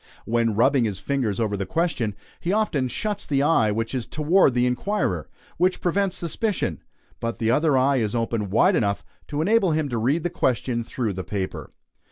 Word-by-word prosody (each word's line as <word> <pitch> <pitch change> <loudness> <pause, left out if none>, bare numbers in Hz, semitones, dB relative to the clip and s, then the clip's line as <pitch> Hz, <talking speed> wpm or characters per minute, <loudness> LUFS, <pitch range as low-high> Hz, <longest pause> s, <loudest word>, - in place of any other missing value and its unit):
When 115 -1 +1
rubbing 125 +2 +3
his 100 -4 -2
fingers 125 -5 -1
over 110 -3 0
the 100 -1 -3
question, 150 - -1 0.2
he 175 - -2
often 195 -11 +1
shuts 205 - -3
the 140 -1 +1
eye 145 -8 +3
which 115 +3 -2
is 125 -3 -3
toward 155 -2 +3
the 125 0 +3
inquirer 125 - -1 0.3
which 180 +2 +2
prevents 190 +1 0
suspicion; 170 - -2 0.4
but 115 0 -3
the 115 0 +1
other 150 +1 +3
eye 135 +1 +3
is 110 -2 -1
open 115 -3 -1
wide 105 - +4
enough 100 -2 0 0.2
to 150 +1 -1
enable 200 -3 +3
him 155 -2 0
to 120 -3 -2
read 140 +9 +1
the 175 - -1
question 120 -1 0
through 115 -2 -3
the 95 0 -5
paper. 95 -2 -4
125 Hz, 190 wpm, -24 LUFS, 110-165 Hz, 0.4 s, wide